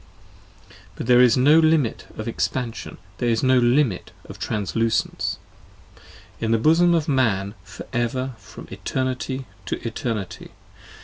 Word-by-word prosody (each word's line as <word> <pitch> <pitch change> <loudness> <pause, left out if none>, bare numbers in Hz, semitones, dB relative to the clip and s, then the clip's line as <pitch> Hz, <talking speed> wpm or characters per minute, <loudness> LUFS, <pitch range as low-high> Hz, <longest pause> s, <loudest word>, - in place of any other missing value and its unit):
35 - - -20 0.2
But - - -5
there 125 0 +6
is 125 -2 +5
no 145 +5 +6
Limit 155 -7 +2
of 110 - -5
Expansion; 120 0 -3 0.2
there 120 - +1
is 115 +2 +1
no 130 -1 +5
Limit 120 -4 +2 0.2
of - - -11
Translucence, 110 +2 -1 1.0
In 115 - -2
the 115 - +3
bosom 165 +8 +4
of 160 -3 0
Man 105 -8 +1
for - - -10
ever 130 +2 -1
from - - -12
eternity 130 0 -3 0.2
to - - -1
eternity. 110 -4 -5
125 Hz, 135 wpm, -23 LUFS, 115-130 Hz, 1.0 s, there